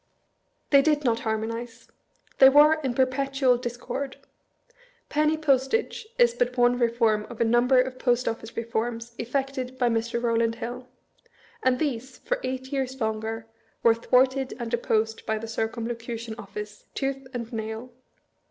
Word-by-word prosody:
They 280 -1 +8
did 300 0 +2
not 235 -3 +2
harmonize. 230 +1 -4 0.5
They 265 - +10
were 300 +3 +6
in 260 -4 -2
perpetual 265 0 +2
dis 240 -1 -4
cord. 270 +2 -5 0.9
Penny 305 +1 +2
postage 310 - +1
is 240 -1 +5
but 245 +1 -1
one 245 0 +4
reform 230 -3 +2
of 240 - -9
a - - +4
number 240 +3 +4
of 255 0 -1
Post 245 -1 +1
Office 225 0 -4
reforms 230 0 -3
effected 260 +1 -3
by 245 -2 +2
Mr. 230 +1 -1
Eowland 230 -1 +1
Hill; 245 +2 -6 0.7
and 255 -1 +3
these, 260 -3 -3
for - - -2
eight 260 +1 -4
years 265 -1 -2
longer, 220 0 -2 0.4
were 230 - +7
thwarted 260 +3 +2
and 235 -2 -5
opposed 220 -2 0
by 220 0 +1
the 225 +1 -6
Circumlocution 230 0 -4
Office, 210 -1 -8
tooth 270 -1 -2
and 235 -2 -6
nail. 220 +2 -5
240 Hz, 145 wpm, -26 LUFS, 230-265 Hz, 0.9 s, They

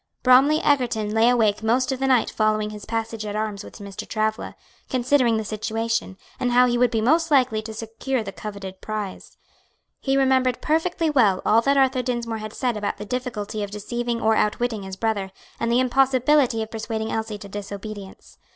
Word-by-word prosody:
Bromly 270 +5 +6
Egerton 240 -7 +1
lay 225 +2 +4
awake 220 -4 +2
most 245 +4 +1
of 265 - -3
the 270 - 0
night 255 -3 +3
following 215 -1 0
his 210 -1 -9
passage 225 -1 -3
at 210 -1 -5
arms 215 -1 -3
with - - -12
Mr. 200 -3 -8
Travilla, 220 0 -2 0.3
considering 255 -2 +2
the 220 - -3
situation, 220 -1 -2 0.2
and 245 -1 0
how 250 +1 +6
he 240 -1 +1
would 245 0 +3
be 225 -1 0
most 320 +8 +3
likely 255 -7 +3
to 220 +1 -8
secure 225 +3 -3
the 200 - -6
coveted 195 -2 -8
prize. 215 -3 -6 0.6
He 270 0 0
remembered 260 -2 +2
perfectly 325 +1 0
well 215 -10 +3
all 225 - +5
that 275 +3 +2
Arthur 265 -1 +3
Dinsmore 235 -2 -3
had 215 0 -7
said 250 -3 -1
about 205 -1 -3
the 210 - -7
difficulty 215 -3 -4
of 205 - -3
deceiving 235 +3 -3
or 220 0 +2
outwitting 220 +1 0
his 190 -1 -7
brother, 205 -2 -1 0.3
and 230 0 0
the 240 - +4
impossibility 255 -1 +3
of 220 - -10
persuading 220 0 -3
Elsie 220 -1 -3
to 205 -1 -10
disobedience. 200 0 -8
225 Hz, 190 wpm, -23 LUFS, 215-255 Hz, 0.6 s, Bromly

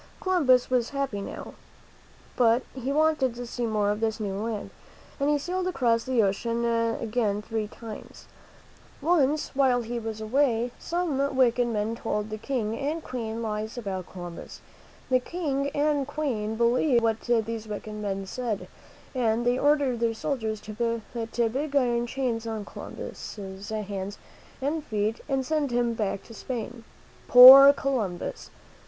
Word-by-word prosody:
Columbus 275 -11 +3
was 245 -2 +2
happy 270 -8 -2
now. - - -7 0.8
But 235 0 +3
he 265 +1 -3
wanted 300 -4 +2
to 245 0 -6
see 240 0 -3
more 210 -2 +1
of 210 - -2
this 220 0 -1
new 205 -3 -3
land, 210 +1 -4 0.5
and 280 +1 +1
he 295 - +3
sailed 360 +5 -2
across 240 -9 +1
the 255 -4 +2
ocean 230 +4 -1
again 230 -2 0
three 220 -1 -3
times. 220 0 -10 0.7
Once, 300 -2 +2
while 255 -3 +3
he 235 +1 -4
was 220 -1 -5
away, 240 +1 +1
some 285 -6 -1
wicked 245 -1 +3
men 220 0 -1
told 215 -2 -3
the 215 - -4
King 225 -3 -2
and 305 +4 -2
Queen 230 -2 -4
lies 215 +1 -4
about 190 -6 -5
Columbus. 175 -2 -8 0.5
The 255 - +5
King 280 -2 -2
and 290 -2 +1
Queen 245 -8 -2
believed 235 +2 +3
what 225 -1 +1
these 230 -2 -1
wicked 215 0 -6
men 200 -2 -3
said, 225 0 -4 0.5
and 240 -2 +1
they 245 +1 +2
ordered 285 -5 +2
their 230 -1 0
soldiers 220 -4 -2
to 230 +2 -2
put 230 -1 -1
big 285 +2 -3
iron 240 -3 +2
chains 235 -3 -2
on 220 -2 -4
Columbus' - - -8 0.3
hands 200 -2 -4 0.5
and 300 +3 -1
feet 215 -3 -2
and 270 -1 0
send 305 -1 0
him 240 -1 +1
back 205 -3 -2
to 230 - -13
Spain. 240 0 -6 0.4
Poor 265 +3 +11
Columbus! 245 -11 -3
235 Hz, 150 wpm, -27 LUFS, 220-270 Hz, 0.8 s, Poor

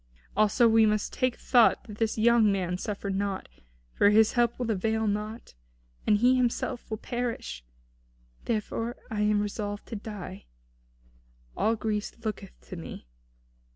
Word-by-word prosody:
Also 215 +3 +4
we 225 -1 +5
must 210 0 0
take 255 -1 0
thought 240 -3 +4
that 210 -1 -11
this 225 -1 0
young 225 -1 +5
man 180 -2 -1
suffer 200 +1 -4
not, 195 0 -2 0.5
for 205 - +5
his 215 +1 +5
help 240 -1 +2
will 245 -2 -1
avail 220 +2 0
naught, 210 +2 -3 0.5
and 210 - +5
he 250 +4 +4
himself 245 0 -1
will 220 - -2
perish. 230 - -4 0.8
Therefore 230 +2 -2 0.2
I 210 -1 -1
am 210 0 +3
resolved 205 0 -4
to 230 - -4
die. 200 - -7 1.1
All 225 - +2
Greece 210 -1 -2
looketh 190 - -5
to 60 - -9
me. - - -8
215 Hz, 145 wpm, -28 LUFS, 205-230 Hz, 1.1 s, we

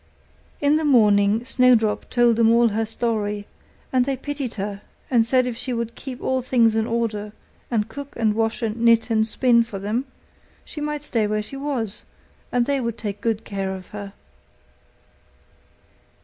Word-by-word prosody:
In 290 +1 +3
the 315 - -1
morning 215 -4 +4
Snowdrop 250 -5 +3
told 240 -2 +3
them 225 -1 +5
all 235 0 +5
her 220 +1 -1
story; 210 -3 -2 0.5
and 255 -1 +4
they 270 +1 -2
pitied 275 -2 -4
her, 200 -1 -4 0.3
and 235 -3 +5
said 255 +1 +3
if 250 -2 -3
she 255 +1 -4
would 235 -1 -3
keep 265 -2 -8
all 260 0 0
things 235 -3 +3
in 220 0 +1
order, 215 -3 -2 0.4
and 220 -3 0
cook 285 +4 -9
and 220 -2 +1
wash 225 +2 -1
and 220 0 -1
knit 230 0 +3
and 220 0 +3
spin 235 +1 +3
for 230 -3 -7
them, 215 +7 -2 0.6
she 300 - -7
might 300 0 -3
stay 230 -7 0
where 210 0 -1
she 275 - -10
was, 270 -7 -3 0.5
and 245 -1 +2
they 280 0 0
would 235 -1 -3
take 205 -2 -5
good 225 -2 -1
care 195 -2 -3
of 185 -1 -11
her. 205 -1 -8
230 Hz, 175 wpm, -23 LUFS, 210-255 Hz, 0.6 s, them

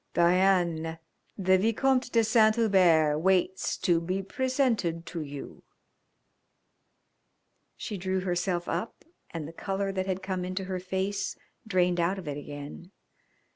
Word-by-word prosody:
"Diane, 170 -2 +2 0.4
the 190 -1 +3
Vicomte 250 +4 +1
de 230 -1 +4
Saint 220 -1 +4
Hubert 175 -9 +4
waits 190 +1 +1
to 170 -2 +2
be 185 +3 -2
presented 230 - 0
to 170 - -5
you." 145 -2 -8 2.2
She 210 - -5
drew 185 +1 -1
herself 175 -1 -1
up 225 - -4 0.2
and 160 -3 -6
the 165 - -10
colour 195 +2 -2
that 190 -1 -2
had 190 0 -2
come 185 -1 -2
into 185 +1 -3
her 185 -1 -3
face 190 +2 -2 0.3
drained 180 -3 +2
out 175 +3 +1
of 185 -5 -8
it 145 - -3
again. 145 +4 -8
185 Hz, 135 wpm, -28 LUFS, 170-195 Hz, 2.2 s, de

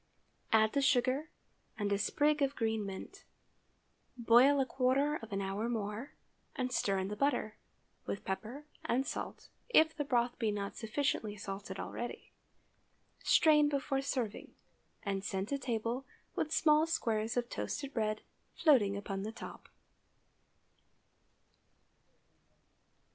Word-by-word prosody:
Add 220 -1 +4
the 280 - +2
sugar, 270 +2 +2 0.5
and 205 -1 -1
a 200 - +1
sprig 295 +8 +2
of 275 0 +1
green 220 -3 0
mint. 385 - -8 0.9
Boil 245 +4 +6
a 270 - +3
quarter 270 +4 +2
of 225 -5 -11
an 195 0 -1
hour 200 +4 -2
more, 220 +2 -3 0.4
and 255 -3 -1
stir 200 -5 +1
in 190 0 -1
the 210 - -3
butter, 245 -5 0 0.5
with 200 - -4
pepper 225 +9 -4 0.2
and 260 +3 +1
salt, - - -5 0.2
if 320 -8 +5
the 295 - -1
broth 245 -3 0
be 225 -3 +1
not 200 -1 -4
sufficiently 225 -2 -1
salted 195 -1 -6
already. 240 - -5 0.9
Strain 300 -2 +5
before 275 -1 0
serving, 250 -6 -3 0.5
and 195 -1 -2
send 195 +2 -2
to 280 - -1
table 240 0 -2 0.3
with 310 - -1
small 310 0 +4
squares 225 -8 0
of 240 -1 +1
toasted 280 +3 -4
bread 215 -2 0 0.3
floating 215 - +4
upon 195 -1 -4
the 215 +2 -4
top. 225 - -10
240 Hz, 130 wpm, -33 LUFS, 210-280 Hz, 0.9 s, Boil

